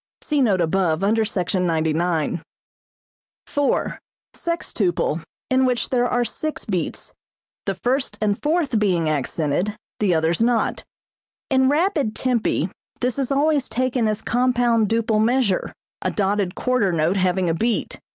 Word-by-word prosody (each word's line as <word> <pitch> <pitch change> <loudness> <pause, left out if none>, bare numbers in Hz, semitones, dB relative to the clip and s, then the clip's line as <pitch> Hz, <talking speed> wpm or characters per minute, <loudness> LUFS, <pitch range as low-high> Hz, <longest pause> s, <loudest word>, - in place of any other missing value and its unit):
(See 295 -2 0
note 200 -8 +3
above, 170 0 +1
under 220 +3 +3
Sec. 185 -5 -2
99.) 165 -2 0 1.0
4. 285 -1 0 0.4
Sextuple, 190 - -1 0.3
in 260 0 +4
which 250 -2 +1
there 245 -1 +2
are 245 0 +1
six 310 +5 -4
beats, 185 -5 -3 0.5
the 195 - 0
first 255 +7 -1
and 205 -1 0
fourth 300 -6 +1
being 180 -6 +1
accented, 155 +6 -1 0.2
the 195 -5 +2
others 160 +4 +1
not. 235 -1 +1 0.7
In 265 0 +4
rapid 295 - +1
tempi 250 -3 0 0.3
this 250 +2 0
is 270 0 -1
always 285 0 +2
taken 250 0 0
as 215 0 -1
compound 240 -3 +2
duple 225 -1 +2
measure, 235 -5 +1 0.3
a - - 0
dotted 200 -2 0
quarter 250 -7 +1
note 165 +3 +1
having 185 -1 +1
a 165 - +2
beat. 225 +7 -1
220 Hz, 135 wpm, -22 LUFS, 180-255 Hz, 1.0 s, in